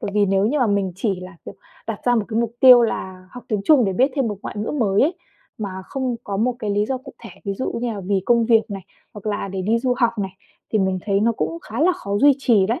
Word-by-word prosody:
bởi - - -4
vì 205 -1 +3
nếu 195 +1 +2
như 290 +7 0
mà 250 - +3
mình 200 -3 0
chỉ 195 -2 -1
là, 185 0 -10
kiểu, - - -9 0.3
đặt 225 -2 -4
ra 245 - +3
một 220 -3 +1
cái 225 0 0
mục 235 -1 -2
tiêu 250 -3 +9
là 185 -5 -3
học 245 - -11
tiếng 215 -3 0
Trung 290 -6 +5
để 195 - 0
biết 260 +9 +2
thêm 270 -4 0
một 210 - -4
ngoại - - -6
ngữ 210 - -2
mới 210 -9 +2
ấy, 320 +6 +2 0.4
mà 205 -3 -4
không 260 -1 -3
có 200 - -3
một 240 +5 +1
cái 215 -5 -3
lý 205 +1 +1
do 260 +2 -2
cụ 260 - -12
thể, 230 - -9
ví 200 - -2
dụ 260 - -3
như 240 -1 -2
là 205 - -6
vì 190 0 -1
công 235 -1 +4
việc 225 -2 +3
này, 195 -1 -5 0.3
hoặc 210 0 -10
là 205 -1 -2
để 190 -1 -4
đi 225 +4 +1
du 250 +1 0
học 235 -2 +3
này, 190 -2 -4 0.4
thì 215 - +3
mình 190 -1 0
thấy 200 -1 +2
nó 230 +2 +2
cũng 330 +8 -3
khá 225 +5 -5
là 355 +4 +4
khó 200 - -4
duy 285 +3 +6
trì 225 -8 +3
đấy. 230 +9 -1
215 Hz, 290 wpm, -21 LUFS, 200-245 Hz, 0.4 s, tiêu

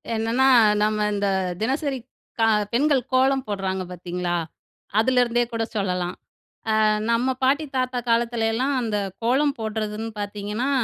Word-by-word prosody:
என்னன்னா 230 +4 +2 0.3
நம்ம 215 0 +1
இந்த 200 0 0 0.3
தினசரி 270 +4 -1 0.4
க - - +1 0.3
பெண்கள் 280 +2 +3
கோலம் 265 +1 +3
போடுறாங்க 190 -2 -2
பார்த்தீங்களா, 180 0 -3 0.6
அதுலேருந்தே 240 0 +3
கூட 230 -1 -1
சொல்லலாம். 180 -3 -1 0.7
அ - - +4 0.3
நம்ம 245 +3 +2
பாட்டி, 285 +4 +2
தாத்தா 255 -1 0
காலத்துலலாம் 230 +2 +1
அந்த 220 -3 -1 0.3
கோலம் 275 +4 +2
போடுறதுன்னு 220 0 -3
பார்த்தீங்கன்னா, 205 +5 -3
230 Hz, 115 wpm, -23 LUFS, 210-260 Hz, 0.7 s, அ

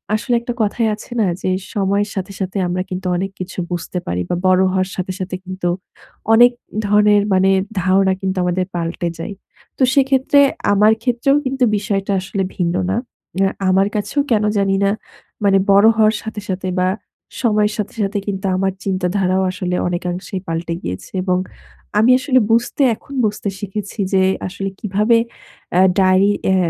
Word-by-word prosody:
আসলে 240 +3 0
একটা 245 +1 -4
কথাই 220 +2 +1
আছে 215 - -14
না - - +3 0.2
যে - - -1 0.3
সময়ের 200 +1 +1
সাথে, 195 0 -4
সাথে 190 0 -3
আমরা 180 +1 -1
কিন্তু 185 0 -4
অনেক 195 +1 -3
কিছু 185 0 -6
বুঝতে 175 +1 -4
পারি 90 +1 -1
বা - - 0
বড় 185 0 +4
হওয়ার 185 0 0
সাথে, 185 0 -3
সাথে 185 0 -4
কিন্তু 185 -1 -3 0.6
অনেক 240 +2 +7 0.4
ধরনের 210 0 +4
মানে 190 +1 +4 0.3
ধারণা 190 +1 +3
কিন্তু 190 -1 -2
আমাদের 180 +1 0
পাল্টে 170 0 -2
যায়। 165 - -5 0.4
তো - - +2
সেক্ষেত্রে 270 0 +3 0.3
আমার 210 +2 +5
ক্ষেত্রেও 245 +3 +2
কিন্তু 265 0 0
বিষয়টা 200 -1 -2
আসলে 195 +1 -3
ভিন্ন 175 -1 0 0.2
না। 200 - 0 0.4
উম 195 +1 +2
আ - - -5 0.2
আমার 195 +2 +3
কাছেও 215 +7 0
কেন 215 -2 +3
জানি 195 -1 +2
না 200 - +3 0.5
মানে 195 -1 +4
বড় 200 +2 +6
হওয়ার 215 0 +4
সাথে, 220 -1 -6
সাথে 185 0 -3
বা 185 - +2 0.5
সময়ের 210 -3 +2
সাথে, 210 - -3
সাথে 200 +1 -1
কিন্তু 195 -1 -3
আমার 190 0 0
চিন্তাধারাও 185 0 0
আসলে 180 -1 -3
অনেকাংশেই 180 +1 -3
পাল্টে 165 +1 -3
গিয়েছে। 90 - -6
এবং 185 -1 +1 0.6
আমি 235 +4 +5
আসলে 260 0 +3
বুঝতে, 235 +5 +1
এখন 280 - -14
বুঝতে 210 -1 -2
শিখেছি 205 +1 -6
যে 190 -1 +4 0.2
আসলে 195 +1 -4
কিভাবে 210 +3 +2 0.6
আ - - +6 0.2
ডায়েরি 190 +2 +4
অ্যা 190 - +3
195 Hz, 165 wpm, -18 LUFS, 185-210 Hz, 0.6 s, অনেক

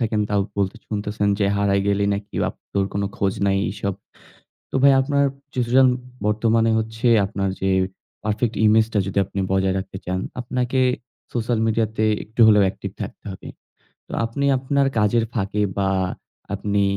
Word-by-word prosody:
থাকেন 110 -2 0
তাও 100 -1 +2 0.5
শুনতেছেন 105 -1 -1
যে, 105 - +2
"হারায় 100 -1 +2
গেলে 100 0 +2
নাকি? 100 +1 -7
আপ - - -7 0.2
তোর 100 -1 +1
কোন 100 - -1
খোঁজ 95 -1 0
নাই" 100 0 +2
এইসব। 100 0 -3 0.8
তো - - -4
ভাই 140 0 +7
আপনার 140 +1 +1 0.3
সিচুয়েশন 130 +1 +4 0.4
বর্তমানে 115 +1 +2
হচ্ছে 110 +2 -1 0.2
আপনার 100 -1 -2
যে 95 - +1 0.5
পারফেক্ট 110 +2 -1
ইমেজটা 110 0 +4
যদি 95 - -5
আপনি 100 - -5
বজায় 95 0 +2
রাখতে 95 0 -5
চান, 95 +1 -1 0.2
আপনাকে 125 +1 -1 0.5
সোশ্যাল 120 -1 0
মিডিয়াতে 110 -1 0 0.2
একটু 110 +2 -2
হলেও 105 -2 +6
একটিভ - - -7
থাকতে - - -7
হবে। 95 - -10 0.6
তো - - -13
আপনি 130 +5 -2
আপনার 135 +1 +1
কাজের 105 +2 +3
ফাঁকে 105 -1 -1 0.2
বা 100 -1 +1 0.6
আপনি 100 0 0
105 Hz, 150 wpm, -22 LUFS, 100-115 Hz, 0.8 s, ভাই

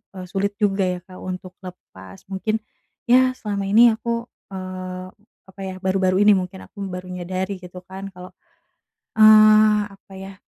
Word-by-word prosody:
eee, 185 -1 -7
sulit 200 +2 -1
juga 195 -2 +2
ya 180 -1 -2
Kak 185 -1 -14
untuk 185 0 -7
lepas, 95 - -12
mungkin 215 +3 -2 0.5
ya 255 +1 +5
selama 200 -2 -3
ini 230 +4 +7
aku, 235 +1 -3 0.3
eee, 185 -1 -6 0.4
apa 190 +1 -13
ya, 190 -1 -5
baru-baru 190 0 +1
ini 210 0 +7
mungkin 185 0 -5
aku 200 -2 -8
baru 180 0 -7
menyadari 185 +2 -4
gitu 180 0 -11
kan 190 +1 -8
kalau, 180 0 -11 0.9
eee, 215 -1 +7
apa 195 0 -18
ya, 195 0 -9
190 Hz, 155 wpm, -22 LUFS, 185-210 Hz, 0.9 s, ini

